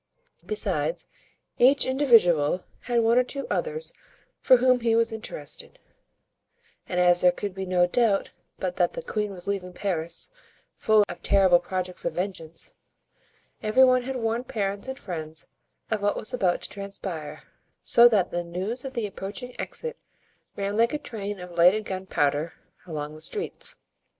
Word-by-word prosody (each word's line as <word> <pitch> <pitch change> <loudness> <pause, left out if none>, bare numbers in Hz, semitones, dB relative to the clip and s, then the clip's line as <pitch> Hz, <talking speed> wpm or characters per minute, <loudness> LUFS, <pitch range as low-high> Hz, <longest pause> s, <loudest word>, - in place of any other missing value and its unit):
Besides, 430 +3 -1 0.5
each 265 +2 +5
individual 190 - +4 0.2
had 240 -1 +2
one 230 +2 +4
or - - +4
two 275 +2 -4
others 475 -1 -2 0.5
for 255 - +6
whom 255 0 +4
he 230 -1 +2
was 230 0 +2
interested; 480 - -5 1.1
and 180 - 0
as 175 0 +5
there 180 - +6
could 200 +2 -5
be 190 0 -5
no 180 -1 +3
doubt 205 +1 +1 0.3
but - - -3
that - - +2
the - - -6
queen 210 - -2
was 180 -2 -6
leaving 190 -2 -3
Paris 170 - -1 0.4
full 215 -1 +4
of - - -8
terrible 190 -3 +5
projects 180 0 -4
of - - -1
vengeance, 175 -3 -5 0.9
every 215 +5 +4
one 255 -1 +5
had 265 +2 -5
warned 230 +1 -2
parents 200 +1 -2
and 265 0 -5
friends 160 -4 -5 0.5
of 215 -2 0
what 205 0 +1
was 235 - 0
about 185 -8 +1
to - - -4
transpire; 185 -7 -5 0.4
so 235 0 +7
that 210 -6 +2
the 175 0 -2
news 190 +8 -4
of 270 0 -7
the 230 -3 -1
approaching 205 +5 -5
exit 475 -1 -4 0.6
ran 200 +1 -2
like 230 +5 +3
a - - +1
train 205 -8 -6
of 180 0 -9
lighted 190 +5 +5
gunpowder 165 -5 -1 0.3
along 150 -2 -5
the 155 - -11
streets. 435 - -2
205 Hz, 160 wpm, -26 LUFS, 180-245 Hz, 1.1 s, so